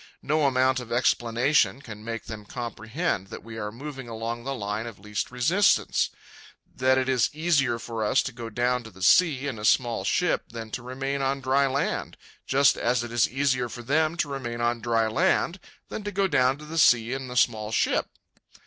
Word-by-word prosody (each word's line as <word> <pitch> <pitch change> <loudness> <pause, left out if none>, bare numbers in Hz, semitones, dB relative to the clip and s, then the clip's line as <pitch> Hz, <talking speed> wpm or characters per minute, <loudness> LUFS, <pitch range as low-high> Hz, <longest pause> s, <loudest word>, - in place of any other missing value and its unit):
No 150 0 +2
amount 130 0 +2
of 120 -2 -9
explanation 120 +3 +2
can 110 -6 -10
make 115 0 -5
them 110 -1 -7
comprehend 115 - -3
that - - -9
we 110 0 -8
are 105 -1 -4
moving 135 +1 -8
along 115 +1 -4
the 135 +1 -3
line 105 0 -3
of 115 -5 -9
least 105 +1 -4
resistance; 160 +12 +2 0.7
that 130 0 +3
it 130 0 +1
is 130 -3 +2
easier 150 -6 +1
for 115 -1 -4
us 110 +6 +2
to 135 - -4
go 120 -1 -7
down 125 +2 0
to 115 - -11
the 95 -2 -10
sea 145 - +4
in 130 -6 -4
a - - -8
small 115 -2 +2
ship 180 - +1
than 115 -1 -8
to 125 - -4
remain 135 +3 -3
on 135 +1 0
dry 135 +1 +2
land, 135 +2 -2 0.3
just 140 0 +4
as 120 0 +1
it 120 - -7
is 120 -1 +2
easier 130 -2 0
for 120 +1 -8
them 155 +6 +1
to 155 - 0
remain 130 -4 -5
on 120 0 0
dry 115 -1 +1
land 175 - +1 0.3
than 215 - -5
to 205 - -4
go 195 -1 +1
down 130 -5 +2
to 150 - -11
the 165 +2 -3
sea 120 -4 +4
in 135 -1 -4
the 125 0 -5
small 110 -4 +2
ship. - - +1
125 Hz, 205 wpm, -26 LUFS, 115-140 Hz, 0.7 s, sea